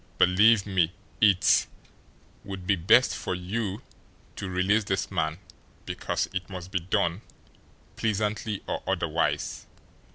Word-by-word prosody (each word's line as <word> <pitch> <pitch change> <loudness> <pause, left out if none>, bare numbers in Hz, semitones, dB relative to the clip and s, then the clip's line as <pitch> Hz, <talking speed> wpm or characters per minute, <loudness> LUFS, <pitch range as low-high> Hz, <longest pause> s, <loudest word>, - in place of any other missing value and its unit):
"Believe 100 +4 +5
me, 90 -4 +1 0.3
it 100 -3 +5 0.8
would 95 -2 -7
be 95 - +3
best 110 +9 +4
for 90 - -3
you 100 +3 -3 0.5
to 100 - -5
release 95 +4 +2
this 95 -1 -2
man, 80 -3 -1 0.5
because - - -2
it 95 -2 -4
must 90 -1 -8
be 95 - 0
done, 85 +1 0 0.8
pleasantly 105 -1 -1
or - - -3
otherwise. - - -1
95 Hz, 120 wpm, -27 LUFS, 90-105 Hz, 0.8 s, Believe